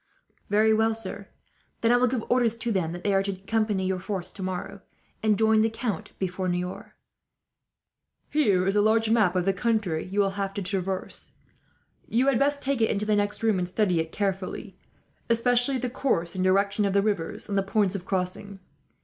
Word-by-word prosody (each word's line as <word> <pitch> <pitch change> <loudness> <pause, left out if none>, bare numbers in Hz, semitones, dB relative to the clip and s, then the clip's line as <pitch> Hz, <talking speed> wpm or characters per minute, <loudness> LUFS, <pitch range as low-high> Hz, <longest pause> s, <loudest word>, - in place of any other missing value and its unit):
"Very 215 +2 +4
well, 220 +1 +2
sir. 200 -2 -5 0.5
Then 230 - +3
I 245 - +5
will 250 +1 +3
give 245 -2 -1
orders 240 -2 +2
to 230 0 -3
them 180 -6 0
that 175 +1 -7
they 200 - +1
are 195 - +3
to 195 0 -2
accompany 200 0 -1
your 185 0 -1
force 185 -1 -4
tomorrow, 185 -2 -5 0.4
and 215 -2 +2
join 220 0 +4
the 225 - +3
count 225 -5 -4
before 185 0 -2
Niort." 180 +4 -3 1.4
"Here 205 -12 +3
is 195 +1 +1
a 205 - +4
large 220 +1 +3
map 210 -6 +3
of 180 -1 +1
the 195 - +2
country 205 -6 0
you 195 +2 -3
will 195 -1 +3
have 195 0 -3
to 200 - -3
traverse. 190 0 -4 0.8
You 240 +4 +2
had 275 -4 +3
best 285 +1 +1
take 270 -3 0
it 225 - +3
into 210 +1 0
the 210 0 +2
next 205 +1 -1
room, 220 -4 +2
and 180 - -1
study 180 -2 +1
it 160 0 -2
carefully; 195 -2 -3 0.5
especially 245 +3 +2
the 250 0 -2
course 235 -9 -1
and 185 - -2
direction 200 +2 +2
of 195 - 0
the 200 0 +3
rivers, 205 -1 -2
and 205 - -3
the 195 - +3
points 195 0 +1
of 195 -3 -4
crossing. 190 +1 -3
205 Hz, 200 wpm, -26 LUFS, 185-225 Hz, 1.4 s, I